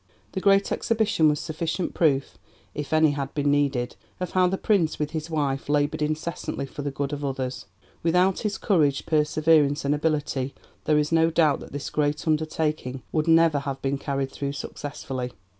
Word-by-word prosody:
The 190 - -3
Great 195 0 +4
Exhibition 220 -8 +2
was 150 -1 0
sufficient 165 +2 -3
proof 140 -5 +1 0.4
if 150 -1 -5
any 155 -1 +4
had 140 -1 -4
been 145 -1 +2
needed 140 -4 0 0.2
of 180 - -3
how 185 -1 +4
the 190 +2 -1
Prince 185 -8 +1
with 150 0 -2
his 160 0 -4
wife 140 -4 -1
laboured 145 0 +1
incessantly 155 -1 -2
for 140 - -8
the 145 - -2
good 140 +1 -3
of 145 0 -4
others. 130 -5 -3 0.3
Without 180 +3 +3
his 205 -2 -2
courage, 150 -9 +2
perseverance, 150 -2 +3
and 140 - +2
ability 145 -3 -1 0.3
there 155 - +3
is 150 +1 +1
no 165 0 +4
doubt 160 -3 +3
that - - -11
this 145 0 -5
great 150 +1 0
undertaking 155 -4 -1
would 155 0 0
never 165 -2 +5
have 140 -1 -4
been 135 0 0
carried 135 -1 -2
through 140 0 -4
successfully. 130 -3 -5
150 Hz, 175 wpm, -25 LUFS, 140-160 Hz, 0.4 s, never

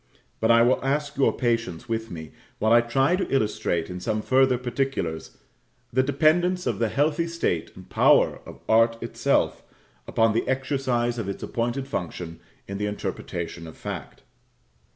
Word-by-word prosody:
But 110 - +1
I 115 0 +6
will 125 +2 +2
ask 145 +2 -1
your 135 - +3
patience 115 -6 -1
with 115 -1 -2
me 80 -2 -8 0.3
while 110 +1 +1
I 120 - +7
try 135 +7 +2
to 190 - -2
illustrate, 105 -9 0
in 90 0 -6
some 105 +3 -2
further 130 -1 +4
particulars, 120 -10 -3 0.6
the 130 - +4
dependence 160 +7 +2
of 110 - -1
the 115 -2 +1
healthy 150 +6 +1
state 165 - -1
and - - -12
power - - +4
of - - -11
art 115 +1 +4
itself - - 0 0.5
upon 115 -1 +2
the 115 - 0
exercise 130 -3 0
of 100 -3 -3
its 100 - -5
appointed 120 +3 -2
function 85 -7 -5 0.3
in 100 0 -5
the 105 - -1
interpretation 85 -4 -5
of 80 - -11
fact. - - -7
120 Hz, 160 wpm, -25 LUFS, 105-135 Hz, 0.6 s, I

